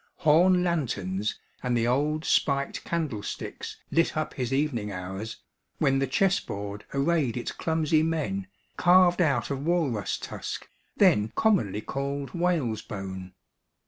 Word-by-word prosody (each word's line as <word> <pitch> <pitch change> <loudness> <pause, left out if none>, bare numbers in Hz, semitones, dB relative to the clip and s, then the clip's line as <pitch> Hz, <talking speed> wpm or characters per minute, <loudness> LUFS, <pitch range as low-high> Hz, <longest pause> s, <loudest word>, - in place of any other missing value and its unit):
Horn 180 +4 +5
lanterns 105 - -1 0.2
and 125 -1 0
the 115 - +1
old 150 +5 +1
spiked 140 -1 +1
candle 155 -11 -2
sticks - - -6
lit 165 -1 +2
up 155 - -2
his 125 -2 -3
evening 135 -7 0
hours, 95 +4 -5 0.4
when 135 0 +2
the 135 - +1
chess 195 0 +2
board 100 0 -6
arrayed 140 -3 +1
its 120 - -3
clumsy 160 -1 +1
men, 145 -13 -1 0.3
carved 180 0 +5
out 140 -6 +1
of 140 0 -3
walrus 150 - 0
tusk, - - -6 0.3
then 105 +1 +4
commonly 145 - +2
called 140 +3 -3
whale's 165 - 0
bone. 95 -2 -7
140 Hz, 135 wpm, -27 LUFS, 105-165 Hz, 0.4 s, Horn